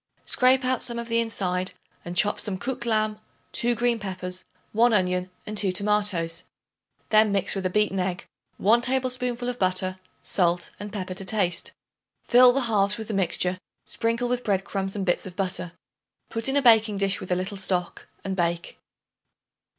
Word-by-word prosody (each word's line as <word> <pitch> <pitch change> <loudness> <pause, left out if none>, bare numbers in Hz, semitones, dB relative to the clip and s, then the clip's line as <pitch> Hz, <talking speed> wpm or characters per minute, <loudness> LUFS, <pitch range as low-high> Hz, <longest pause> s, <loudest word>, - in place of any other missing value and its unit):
Scrape 255 0 +3
out 255 -1 +1
some 235 -1 -2
of 235 0 -5
the 230 0 +2
inside 185 -5 -2 0.3
and 175 +1 -6
chop 205 +3 +3
some 195 -3 -3
cooked 240 +3 -4
lamb, 215 -1 +1 0.3
2 240 0 0
green 235 0 +1
peppers, 185 -2 -4 0.3
1 235 +2 +3
onion, 180 -2 +1 0.2
and 210 - -5
2 200 -2 +4
tomatoes. 200 -4 +1 0.7
Then 215 -1 +5
mix 200 -2 +1
with 190 -2 -1
a - - -4
beaten 210 0 +1
egg, 180 -1 -2 0.3
1 225 +4 +4
tablespoonful 250 -1 -1
of 245 0 -3
butter, 185 0 0 0.2
salt 175 -2 0
and 205 0 -7
pepper 185 -3 -4
to 190 - -6
taste. 185 -4 -1 0.5
Fill 250 0 +7
the 275 +2 0
halves 210 -4 +2
with 220 -1 -7
the - - -2
mixture; 185 -1 +1 0.3
sprinkle 230 +1 -1
with 245 0 -1
bread 195 -3 0
crumbs 195 0 -3
and 195 -2 -2
bits 175 +1 0
of 180 - -10
butter. 180 -3 -2 0.6
Put 225 +3 0
in 275 - +1
a 280 - +2
baking 220 -3 +5
dish 195 -1 +1
with 185 - -7
a - - +3
little 185 +3 -4
stock 185 -2 -1 0.2
and 195 -1 -3
bake. 170 -1 -2
205 Hz, 180 wpm, -25 LUFS, 185-230 Hz, 0.7 s, Fill